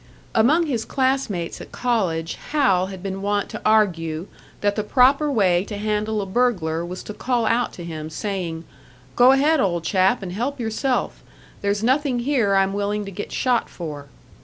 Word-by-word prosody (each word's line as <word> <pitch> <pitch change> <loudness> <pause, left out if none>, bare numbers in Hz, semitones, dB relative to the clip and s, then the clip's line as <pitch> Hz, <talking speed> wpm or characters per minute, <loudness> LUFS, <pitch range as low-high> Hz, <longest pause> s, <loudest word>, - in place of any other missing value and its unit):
Among 295 +10 +4
his 245 -7 -1
class 265 0 0
mates 175 -4 -4
at - - -11
college, 185 -10 -1 0.2
Hal 220 -12 +2
had 190 -1 -9
been 195 0 -4
wont 205 0 -1
to - - -7
argue 170 -7 +2 0.4
that 205 0 +1
the 215 - -1
proper 275 +6 +4
way 185 -7 +3
to 205 - -6
handle 210 0 -1
a - - -5
burglar 190 -7 0
was 180 +2 -6
to 210 - -7
call 240 0 0
out 235 +2 +1
to 175 - -8
him, 155 -2 -6
saying, 170 -2 -4 0.5
"Go 245 +1 +7
ahead, 295 +3 +3
old 175 -7 0
chap, 190 +6 +2
and 180 - -5
help 250 +8 -3
yourself; 240 +3 -1 0.4
there's 200 +1 0
nothing 260 +1 +2
here 240 -6 +1
I'm 195 0 +2
willing 205 +1 -1
to 195 - -7
get 205 +2 -6
shot 250 -2 +1
for." 150 -4 -7
205 Hz, 180 wpm, -22 LUFS, 185-245 Hz, 0.5 s, Go